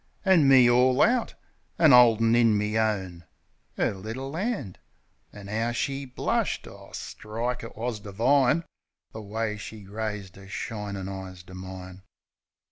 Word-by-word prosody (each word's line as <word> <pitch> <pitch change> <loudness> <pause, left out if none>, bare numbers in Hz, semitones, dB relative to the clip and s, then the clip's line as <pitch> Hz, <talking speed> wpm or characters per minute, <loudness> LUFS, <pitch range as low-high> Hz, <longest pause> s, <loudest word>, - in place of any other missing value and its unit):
An' 180 -7 +5
me 130 -2 +7
all 125 +2 +4
out; 240 +1 +1 0.4
an' 160 -5 +6
'oldin' 115 -2 +6
in 115 -3 +4
me 105 +1 -1
own 95 -6 -1 0.5
'Er - - +1
little 115 +9 -6
'and. 185 - -3 0.5
An' 100 -1 -11
'ow 115 +3 -1
she 135 +3 -2
blushed! 125 - -2
O, - - -13
strike! 115 +3 -4
it 115 - -10
was 115 -1 -3
divine 125 - +2 0.5
The 110 - -8
way 105 +1 -3
she 105 0 -9
raised 105 -2 -5
'er 95 - -13
shinin' 100 -1 -5
eyes 95 -2 -8
to 95 - -14
mine. 95 0 -9
110 Hz, 140 wpm, -26 LUFS, 100-125 Hz, 0.5 s, me